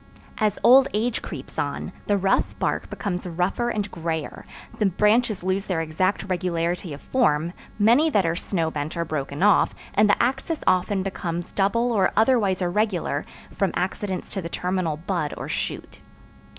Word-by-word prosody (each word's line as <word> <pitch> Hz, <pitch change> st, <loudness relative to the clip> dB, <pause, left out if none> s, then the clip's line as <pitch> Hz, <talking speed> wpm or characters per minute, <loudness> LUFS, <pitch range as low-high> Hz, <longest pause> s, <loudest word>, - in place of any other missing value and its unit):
As 210 Hz, -2 st, +1 dB
old 265 Hz, +2 st, +7 dB
age 225 Hz, +2 st, 0 dB
creeps 145 Hz, -1 st, -7 dB
on, 145 Hz, +4 st, -3 dB, 0.2 s
the 205 Hz, -, +3 dB
rough 195 Hz, 0 st, +1 dB
bark -, -, -1 dB
becomes 185 Hz, -3 st, -3 dB
rougher 180 Hz, +8 st, -1 dB
and 210 Hz, -3 st, -2 dB
grayer, 160 Hz, -2 st, -4 dB, 0.3 s
the 210 Hz, -, +3 dB
branches 210 Hz, +2 st, +2 dB
lose 190 Hz, +2 st, -1 dB
their 180 Hz, -4 st, 0 dB
exact 165 Hz, +5 st, 0 dB
regularity 175 Hz, -2 st, -2 dB
of 145 Hz, -, -8 dB
form, 170 Hz, -, +1 dB, 0.2 s
many 235 Hz, +9 st, +5 dB
that 205 Hz, -, +2 dB
are 165 Hz, 0 st, +1 dB
snow 170 Hz, -3 st, -1 dB
bent 150 Hz, +3 st, -4 dB
are 170 Hz, -, 0 dB
broken 150 Hz, 0 st, -3 dB
off 205 Hz, 0 st, +4 dB, 0.2 s
and 210 Hz, +1 st, +4 dB
the -, -, +3 dB
axis 270 Hz, +6 st, 0 dB
often 185 Hz, +1 st, +2 dB
becomes 175 Hz, -2 st, -4 dB
double 230 Hz, +5 st, +1 dB
or 200 Hz, -5 st, +2 dB
otherwise 215 Hz, -5 st, +3 dB
irregular 180 Hz, -5 st, 0 dB, 0.3 s
from 195 Hz, -, +1 dB
accidents 185 Hz, +1 st, -3 dB
to 195 Hz, -, -2 dB
the 170 Hz, -, -5 dB
terminal 180 Hz, -3 st, -1 dB
bud 170 Hz, -3 st, -2 dB
or -, -, -5 dB
shoot. -, -, -4 dB
185 Hz, 165 wpm, -24 LUFS, 170-210 Hz, 0.3 s, old